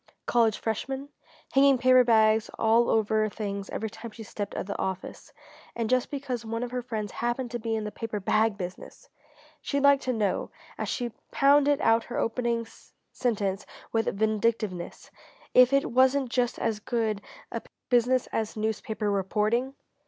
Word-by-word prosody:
College 230 -3 +3
freshmen? 265 +5 -3 0.4
Hanging 275 0 +5
paper 255 0 +6
bags 220 -2 +4
all 230 +1 +3
over 220 0 +2
her 215 - +1
things 200 -2 -5
every 220 - -3
time 225 +1 -8
she 225 +1 -10
stepped 205 -1 -6
out - - -2
of - - -6
the 200 - -4
office 190 -1 -5 0.4
and 230 -1 -2
just 255 -1 +2
because 265 -4 -4
one 230 +1 -3
of 245 - -5
her 250 0 -2
friends 220 -4 -4
happened 240 +1 -2
to 240 - -3
be 225 0 -2
in 220 - -2
the 210 - -4
paper 220 -2 -4
bag 215 +2 +1
business! 180 -2 -8 0.5
She'd 280 -1 -1
like 280 -1 +6
to 255 - -1
know 210 -5 -1 0.3
as - - -4
she 240 -2 -2 0.2
pounded 285 0 +4
out 225 0 +3
her 240 - -5
opening 235 0 0 0.5
sentence 205 -5 -1 0.3
with 225 -1 0
vindictiveness 215 -4 -1 0.4
if 250 0 +7
it 275 -2 +2
wasn't 260 +1 +3
just 245 -1 0
as 220 -2 -1
good 220 -2 -1 0.3
a - - -3 0.3
business 245 +1 +3
as 220 0 -2
newspaper 215 -1 -2
reporting? 215 +7 0
230 Hz, 165 wpm, -27 LUFS, 215-250 Hz, 0.5 s, if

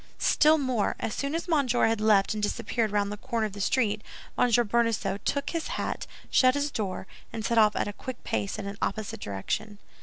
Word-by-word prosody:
"Still 310 +1 +4
more; 255 -7 0
as 215 - -2
soon 280 +2 -2
as 335 - -3
Monsieur 275 -7 +2
had 225 -1 +1
left 210 -1 +4
and 215 - -3
disappeared 225 +1 -1
round 205 0 0
the 210 - -5
corner 235 -1 -2
of 210 - -5
the 200 - -6
street, 215 -1 +1 0.3
Monsieur 240 -1 +4
Bonacieux 230 -2 0
took 280 0 -1
his 330 -2 -2
hat, - - -3 0.2
shut 255 0 +5
his 285 0 0
door, 195 -6 -3 0.3
and 220 -2 -4
set 230 -1 +3
off 210 -1 +5
at - - 0
a 205 - -4
quick 255 +3 -8
pace 200 +1 -2
in 210 - -5
an 200 0 -6
opposite 215 +1 -2
direction." 150 - -4
220 Hz, 210 wpm, -27 LUFS, 205-255 Hz, 0.3 s, shut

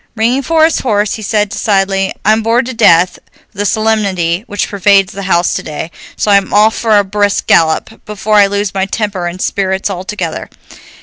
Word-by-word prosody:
Ringing 235 +4 +1
for 315 +3 +2
his 325 - 0
horse 210 -4 0
he 220 - -6
said 210 0 0
decidedly, 195 -1 0
"I'm 215 +2 +3
bored 230 +2 +1
to 260 - -5
death 185 -5 +3 0.3
with 200 - -14
the 205 - 0
solemnity 200 -5 0
which 205 -2 -2
pervades 200 0 +2
the 200 - -7
house 175 -1 +2
today, 160 +2 -5 0.3
so 210 - 0
I'm 200 -1 +2
off 215 +2 +3
for 220 -2 +2
a 205 - +3
brisk 205 +1 -1
gallop, 165 +7 +1
before 210 0 -1
I 200 -1 +6
lose 200 0 -2
my 190 0 -1
temper 200 -4 -3
and 175 +2 -6
spirits 190 +1 -2
altogether." 185 -2 -5
205 Hz, 185 wpm, -13 LUFS, 190-215 Hz, 0.3 s, I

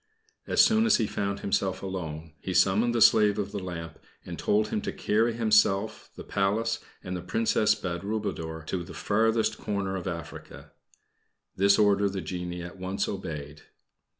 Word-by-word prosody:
As - - +5
soon 225 0 +3
as 220 - +5
he 115 - +1
found 100 -1 -3
himself 95 -1 -1
alone, 80 -5 -5
he 95 +3 -4
summoned 105 +6 +3
the 115 - +6
slave 105 -2 +5
of 100 -1 -2
the 105 - -3
lamp, 85 -3 -7 0.3
and - - -7
told 105 +1 +1
him - - -1
to - - -3
carry 115 +3 +1
himself, 105 -3 +2
the - - -8
Palace, 110 +4 0 0.2
and 90 - -4
the 90 - -4
Princess 105 +2 +2
Badroulboudour 90 -4 -4
to 90 +1 -3
the 85 - -11
farthest 110 +2 +1
corner 100 -2 -2
of 95 -1 -5
Africa. 85 -3 -8 0.8
This 100 +1 +4
order 100 -1 +3
the 95 0 -4
genie 90 +1 -5
at 90 +1 -9
once 95 +2 -2
obeyed. 75 -6 -6
100 Hz, 165 wpm, -27 LUFS, 90-105 Hz, 0.8 s, the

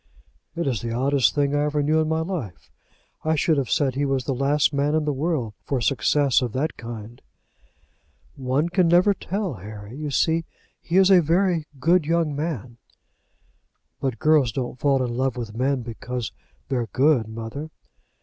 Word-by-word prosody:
"It 170 - -2
is 125 -7 -1
the 115 - -4
oddest 135 +2 +2
thing 145 -1 +1
I 145 0 +2
ever 150 0 0
knew 155 +2 +2
in 155 - 0
my 160 0 +1
life. 160 - -5 0.5
I 160 0 +1
should 155 +1 +2
have 135 -4 -1
said 135 -3 +1
he 140 +3 -1
was 135 -2 0
the 135 - -1
last 140 +3 +2
man 145 +2 +1
in 155 -1 +1
the 150 - 0
world 135 -6 -1
for 135 - -1
success 140 +2 +2
of 120 -4 -3
that 145 +5 -1
kind." 115 0 -9 1.1
"One 135 +3 0
never 180 +2 +5
can - - -15
tell, 195 -3 -1
Harry. 105 +2 -9
You 150 +1 -4
see 160 +4 +1 0.4
he 170 - 0
is 190 0 +6
a 185 -2 +7
very 170 0 +1
good 165 +2 +3
young 165 -3 +1
man." 130 -6 -4 1.2
"But 135 -4 -2
girls 150 -3 +3
don't 125 +1 -4
fall 135 -2 +2
in 120 -1 -3
love 130 0 -1
with 115 -3 -6
men 130 +1 0
because 120 +1 -5 0.4
they're 125 -4 -1
good, 130 +1 +2
mother." 115 +7 -6
140 Hz, 180 wpm, -24 LUFS, 125-155 Hz, 1.2 s, a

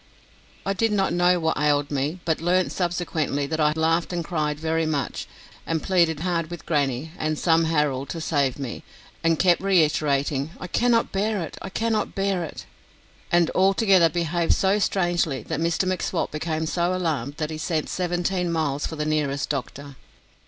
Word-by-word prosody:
I 195 - +1
did 225 +3 +1
not 195 -2 +1
know 175 0 +3
what 160 -2 0
ailed 145 -1 +2
me, 145 +5 -2
but 160 -1 0
learnt 180 +2 +2
subsequently 165 -5 -1
that 160 +3 -3
I 150 -1 +4
laughed 165 +2 +1
and 170 -2 -2
cried 150 -3 -1
very 160 0 0
much, 145 -3 -2 0.4
and 165 -1 -2
pleaded 170 -5 +2
hard 170 -2 -1
with 175 -1 -8
grannie 145 -1 0
and 155 0 -1
some 165 0 +3
Harold 150 -4 0
to 165 - -4
save 140 -5 0
me, 135 -4 -6 0.4
and 165 -1 +3
kept 175 -1 +3
reiterating, 150 -5 +1
"I - - -6
cannot 230 +5 +2
bear 200 -1 0
it, 160 - -7
I - - -6
cannot 220 +2 -1
bear 195 -2 0
it," 160 - -8 0.7
and 175 -1 +3
altogether 190 -2 +4
behaved 170 +1 +1
so 195 +2 +2
strangely 175 - 0
that - - -3
Mr 170 +3 +1
M'Swat 185 -1 -1
became 155 +1 -2
so 175 +2 0
alarmed 150 -7 -2
that 155 0 -2
he 155 - -5
sent 160 -1 -1
seventeen 180 0 -1
miles 150 -3 -1
for 160 - -6
the 150 0 -2
nearest 150 -3 -1
doctor. 140 0 -5
165 Hz, 175 wpm, -24 LUFS, 150-180 Hz, 0.7 s, I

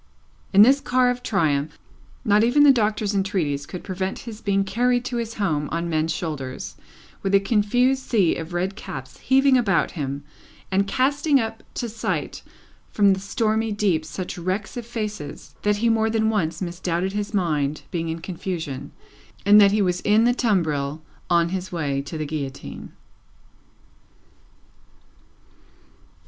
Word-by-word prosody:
In 200 +1 +8
this 270 +5 +5
car 255 -2 +2
of 245 0 -5
triumph, 150 -8 0 0.5
not 210 -1 +4
even 260 +5 +4
the 290 - +8
Doctor's 215 -4 +1
entreaties 180 -8 -1
could 180 - -7
prevent 190 0 -3
his 225 -2 -9
being 195 -1 +1
carried 245 +5 +1
to 245 - -3
his 230 -1 -4
home 155 -8 -1
on 170 +1 -2
men's 160 +1 +1
shoulders, 150 -6 -5 0.5
with 195 0 +1
a - - +7
confused 245 +6 +2
sea 205 -10 +2
of 165 +1 -6
red 185 +3 -1
caps 130 -7 -8
heaving 265 0 +4
about 210 -5 +1
him, 140 -3 -4 0.5
and 195 +1 +2
casting 285 +5 +2
up 225 -1 -3
to 240 - -2
sight 225 0 -3 0.5
from 200 -2 +4
the 190 - -3
stormy 220 +2 0
deep 200 -6 +1
such 175 +3 -6
wrecks 185 +3 -3
of 240 -2 -6
faces, 210 -11 -6
that 210 0 +2
he 235 +3 +1
more 225 -1 +2
than 220 0 +1
once 190 -4 -1
misdoubted 175 +1 -2
his 205 0 -3
mind 155 -7 0
being 165 -1 -2
in 165 +1 -4
confusion, 165 -6 -5 0.5
and 205 +1 +8
that 200 -1 +6
he 210 0 +2
was 180 -1 0
in 215 +2 +4
the 245 +1 +4
tumbril 160 - 0 0.3
on 170 -1 +3
his 185 0 -4
way 145 -5 -1
to 150 +3 -7
the 155 - -3
Guillotine. 140 -3 -6
195 Hz, 155 wpm, -23 LUFS, 165-225 Hz, 0.5 s, In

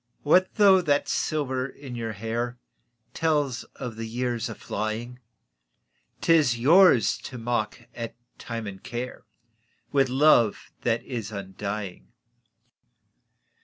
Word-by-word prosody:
What 180 +5 +4
though 195 -3 +6
that 145 -4 +1
silver 130 -4 -1
in 135 -1 -10
your 115 -2 -3
hair 115 +3 -3 0.6
Tells 145 -6 0
of 120 -3 -6
the 115 0 -4
years 120 0 -2
aflying? 110 +3 -4 1.0
'T 165 - +4
is 145 -7 +4
yours 145 - +5
to 130 - -8
mock 115 0 -2
at 115 -1 -6 0.2
Time 115 -2 -5
and 95 -2 -7
Care 120 +2 -6 0.7
With 135 -2 +3
love 130 -5 +3
that 115 -1 0
is 115 -5 -5
undying. 100 0 -5
120 Hz, 115 wpm, -26 LUFS, 110-140 Hz, 1.0 s, though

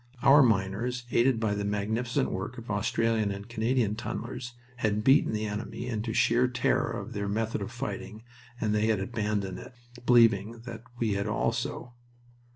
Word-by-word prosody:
Our 145 +2 +8
miners, 115 +2 +1
aided 120 -1 +3
by 110 -2 0
the 100 0 -2
magnificent 110 +4 -1
work - - -4
of - - -7
Australian 115 -2 +1
and 100 0 -6
Canadian 115 -1 0
tunnelers, 120 +2 -5 0.2
had 105 -3 0
beaten 135 +5 +5
the 110 0 -2
enemy 105 +3 -4
into 115 -2 -3
sheer 120 +3 +3
terror 125 - +1
of - - -5
their 100 0 -3
method 110 +1 -1
of 100 - -5
fighting 110 -2 -6 0.4
and 110 -1 0
they 105 +1 +2
had 110 -3 +2
abandoned 105 -3 -2
it, 125 - -12 0.3
believing 115 -2 +4
that 115 -2 -7 0.2
we 115 -3 0
had 100 +1 -1
also. 115 +3 -2
110 Hz, 165 wpm, -28 LUFS, 105-120 Hz, 0.4 s, Our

